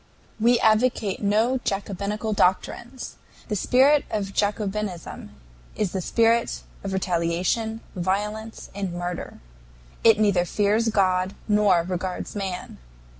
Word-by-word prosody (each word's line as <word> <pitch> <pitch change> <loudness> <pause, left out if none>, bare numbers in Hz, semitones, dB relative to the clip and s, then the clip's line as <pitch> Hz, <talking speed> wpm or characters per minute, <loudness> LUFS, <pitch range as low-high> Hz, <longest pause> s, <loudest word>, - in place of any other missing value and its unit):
"We 235 +2 +4
advocate 220 -2 +2
no 220 +5 +2
Jacobinical 205 +1 -2
doctrines. 235 +7 -1 0.3
The 210 - 0
spirit 270 +7 +4
of 200 -2 -3
Jacobinism 205 - -2 0.5
is 205 -4 -1
the 190 - -2
spirit 230 +4 +2 0.2
of 195 - -3
retaliation, 185 +5 0
violence, 210 +5 -3
and 195 -3 -3
murder. 175 0 -5 0.6
It 225 -2 +7
neither 200 -4 +3
fears 210 +4 +1
God 185 -2 +1
nor 205 -5 +4
regards 180 +2 -4
man. 190 -3 -5
205 Hz, 110 wpm, -24 LUFS, 185-220 Hz, 0.6 s, It